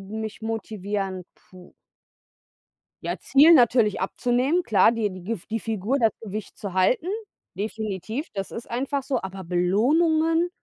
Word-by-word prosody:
mich 220 Hz, +3 st, -6 dB
motivieren 205 Hz, -3 st, -3 dB
puh. 180 Hz, -1 st, -17 dB, 1.3 s
Ja, -, -, -2 dB
Ziel 300 Hz, +5 st, +6 dB
natürlich 235 Hz, -, +4 dB
abzunehmen. 250 Hz, -, +1 dB
Klar, 205 Hz, 0 st, +4 dB
die 225 Hz, -3 st, -1 dB
die 185 Hz, -1 st, -9 dB
Gif 210 Hz, -1 st, -4 dB
die 225 Hz, +1 st, -2 dB
Figur, 225 Hz, +4 st, -1 dB
das 225 Hz, -2 st, +4 dB
Gewicht 215 Hz, -1 st, -7 dB
zu 200 Hz, -3 st, -6 dB
halten. 190 Hz, -, +2 dB, 0.5 s
Definitiv, 220 Hz, -, -4 dB
das 195 Hz, -1 st, -4 dB
ist 230 Hz, -, -8 dB
einfach 270 Hz, +3 st, -2 dB
so. 265 Hz, -3 st, -1 dB
Aber 190 Hz, 0 st, -7 dB
Belohnungen? 315 Hz, -, +2 dB
220 Hz, 135 wpm, -24 LUFS, 195-260 Hz, 1.3 s, Ziel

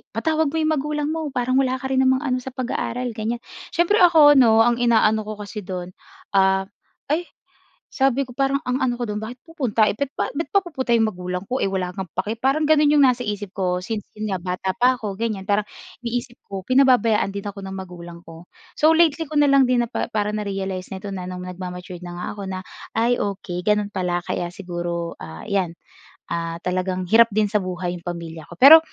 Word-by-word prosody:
"Patawag 315 Hz, +5 st, +1 dB
mo 305 Hz, -, -4 dB
'yong 315 Hz, 0 st, +1 dB
magulang 300 Hz, +1 st, -2 dB
mo. 320 Hz, -1 st, -2 dB
Parang 255 Hz, 0 st, +1 dB
wala 260 Hz, -1 st, +1 dB
ka 265 Hz, 0 st, -5 dB
rin 260 Hz, -, +2 dB
namang 260 Hz, +2 st, +3 dB
ano 255 Hz, -2 st, 0 dB
sa 260 Hz, 0 st, -9 dB
pag-aaral," 250 Hz, -1 st, -2 dB
ganyan. 225 Hz, +2 st, -3 dB, 0.3 s
Siyempre 350 Hz, +5 st, +3 dB
ako 320 Hz, -5 st, +7 dB
’no, 225 Hz, -2 st, +6 dB
ang 240 Hz, 0 st, +2 dB
inaano 220 Hz, -3 st, +3 dB
ko 215 Hz, -, -4 dB
kasi 210 Hz, +1 st, -7 dB
do'n, 180 Hz, -2 st, -6 dB, 0.4 s
ah, 190 Hz, -1 st, +3 dB, 0.5 s
ay 340 Hz, +3 st, 0 dB, 0.7 s
sabi 270 Hz, 0 st, +2 dB
ko 245 Hz, -, -12 dB
parang 275 Hz, +1 st, +1 dB
ang 250 Hz, +1 st, -1 dB
ano 245 Hz, -2 st, +1 dB
ko 240 Hz, -, -2 dB
do'n, 210 Hz, 0 st, -4 dB
"Bakit 240 Hz, +5 st, -8 dB
pupunta, 255 Hz, -10 st, +1 dB
eh, -, -, +1 dB
ba't 275 Hz, +2 st, -3 dB
ba't 325 Hz, +4 st, -3 dB
pa 395 Hz, -2 st, +2 dB
pupunta 260 Hz, -8 st, 0 dB
'yong 220 Hz, -2 st, +1 dB
magulang 180 Hz, +1 st, -5 dB
ko, 255 Hz, +4 st, -2 dB
eh, 195 Hz, -, +1 dB
wala 180 Hz, -2 st, -2 dB
ngang 190 Hz, -3 st, -6 dB
pake." 215 Hz, -, -1 dB
Parang 280 Hz, +4 st, +2 dB
gano'n 300 Hz, -1 st, +4 dB
'yong 290 Hz, -2 st, +6 dB
nasa 250 Hz, -1 st, +2 dB
isip 205 Hz, -3 st, -4 dB
ko 180 Hz, -1 st, -1 dB
since 220 Hz, -2 st, -3 dB, 0.2 s
'yun 215 Hz, -2 st, -2 dB
nga 180 Hz, -, -3 dB
bata 185 Hz, +1 st, -2 dB
pa 250 Hz, +1 st, +3 dB
ako 210 Hz, -4 st, -4 dB
ganyan. 210 Hz, -2 st, -3 dB
Parang 205 Hz, 0 st, +2 dB, 0.4 s
iniisip 240 Hz, +1 st, -4 dB
ko 195 Hz, -1 st, -7 dB
pinababayaan 250 Hz, -6 st, +4 dB
din 200 Hz, +1 st, -6 dB
ako 200 Hz, 0 st, -6 dB
ng 190 Hz, 0 st, -6 dB
magulang 175 Hz, -2 st, -9 dB
ko. 165 Hz, +1 st, -13 dB, 0.2 s
So, 310 Hz, -, +4 dB
lately 325 Hz, -2 st, +3 dB
ko 305 Hz, -, -2 dB
na 290 Hz, -, +6 dB
lang 275 Hz, -2 st, +5 dB
din 240 Hz, -1 st, +3 dB
napa 230 Hz, -, -3 dB
parang 210 Hz, -1 st, -1 dB
na-realize 195 Hz, -2 st, -4 dB
na 190 Hz, -, -5 dB
ito 195 Hz, +1 st, -6 dB
na 180 Hz, -1 st, -5 dB
nung 180 Hz, 0 st, -6 dB
nagma-matured 180 Hz, -1 st, -7 dB
na 175 Hz, 0 st, -7 dB
nga -, -, -4 dB
ako 205 Hz, -, -8 dB
na, 185 Hz, 0 st, -4 dB, 0.4 s
"Ay, 240 Hz, +2 st, +2 dB
okey. 190 Hz, -3 st, -3 dB
Gano'n 210 Hz, +1 st, +1 dB
pala 175 Hz, -1 st, -1 dB
kaya 175 Hz, -1 st, -2 dB
siguro, 175 Hz, -2 st, -4 dB
ah, 80 Hz, 0 st, -9 dB
'yan. 180 Hz, -4 st, -1 dB, 0.5 s
Ah, 165 Hz, 0 st, -3 dB
talagang 185 Hz, 0 st, -1 dB
hirap 230 Hz, 0 st, +7 dB
din 210 Hz, -2 st, +2 dB
sa 210 Hz, -, +3 dB
buhay 180 Hz, -1 st, -3 dB
'yung 175 Hz, 0 st, -8 dB
pamilya 165 Hz, -2 st, -6 dB
ko." 175 Hz, -, -11 dB
Pero 290 Hz, -, +10 dB
215 Hz, 215 wpm, -22 LUFS, 185-260 Hz, 0.7 s, Pero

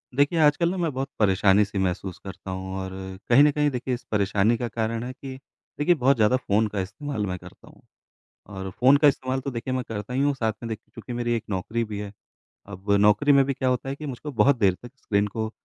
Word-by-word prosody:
देखिए, 145 Hz, +4 st, +2 dB
आजकल 155 Hz, +2 st, +4 dB
ना 190 Hz, -, -3 dB
मैं 170 Hz, -3 st, 0 dB
बहुत 135 Hz, +1 st, -3 dB
परेशानी 100 Hz, 0 st, +4 dB
सी 100 Hz, 0 st, -7 dB
महसूस 95 Hz, -1 st, -2 dB
करता 95 Hz, 0 st, -8 dB
हूँ 95 Hz, 0 st, -5 dB
और 95 Hz, 0 st, -5 dB
अ, 95 Hz, 0 st, -7 dB
कहीं 125 Hz, +4 st, +7 dB
न 150 Hz, -, +5 dB
कहीं 150 Hz, 0 st, +1 dB
देखिए 125 Hz, 0 st, -3 dB
इस 125 Hz, -, -4 dB
परेशानी 105 Hz, +2 st, +2 dB
का 120 Hz, -, -2 dB
कारण 115 Hz, 0 st, -2 dB
है 125 Hz, -, -5 dB
कि 130 Hz, 0 st, -8 dB, 0.4 s
देखिए 175 Hz, +4 st, +4 dB
बहुत 135 Hz, -1 st, +3 dB
ज़्यादा 110 Hz, +1 st, +3 dB
फ़ोन 110 Hz, -3 st, +1 dB
का 105 Hz, -1 st, -4 dB
इस्तेमाल 110 Hz, +4 st, -4 dB
मैं 90 Hz, -2 st, -3 dB
करता -, -, -15 dB
हूँ। -, -, -18 dB, 0.8 s
और 95 Hz, 0 st, -5 dB
फ़ोन 130 Hz, +8 st, +4 dB
का 145 Hz, +1 st, +5 dB
इस्तेमाल 130 Hz, -1 st, -1 dB
तो 140 Hz, +1 st, -4 dB
देखिए 125 Hz, +1 st, -4 dB
मैं 130 Hz, -, -1 dB
करता 110 Hz, +2 st, -5 dB
ही 130 Hz, -, +1 dB
हूँ। 145 Hz, 0 st, +2 dB
साथ 110 Hz, -4 st, -1 dB
में 115 Hz, -1 st, -2 dB
चूँकि 120 Hz, -, -11 dB
मेरी 120 Hz, 0 st, -1 dB
एक 115 Hz, -, -5 dB
नौकरी 110 Hz, +5 st, -2 dB
भी 105 Hz, -2 st, -6 dB
है। 100 Hz, -1 st, -6 dB, 0.5 s
अब 100 Hz, 0 st, -7 dB
नौकरी 105 Hz, +8 st, +4 dB
में 140 Hz, -1 st, +6 dB
भी 140 Hz, -, -1 dB
क्या 130 Hz, 0 st, -1 dB
होता 125 Hz, +1 st, -1 dB
है 135 Hz, -, -2 dB
कि 150 Hz, -, -7 dB
मुझको 145 Hz, +2 st, -6 dB
बहुत 130 Hz, +4 st, +4 dB
देर 100 Hz, -5 st, +3 dB
तक 120 Hz, -, -10 dB
स्क्रीन 100 Hz, -5 st, 0 dB
को 110 Hz, +2 st, -3 dB
115 Hz, 240 wpm, -25 LUFS, 100-135 Hz, 0.8 s, कहीं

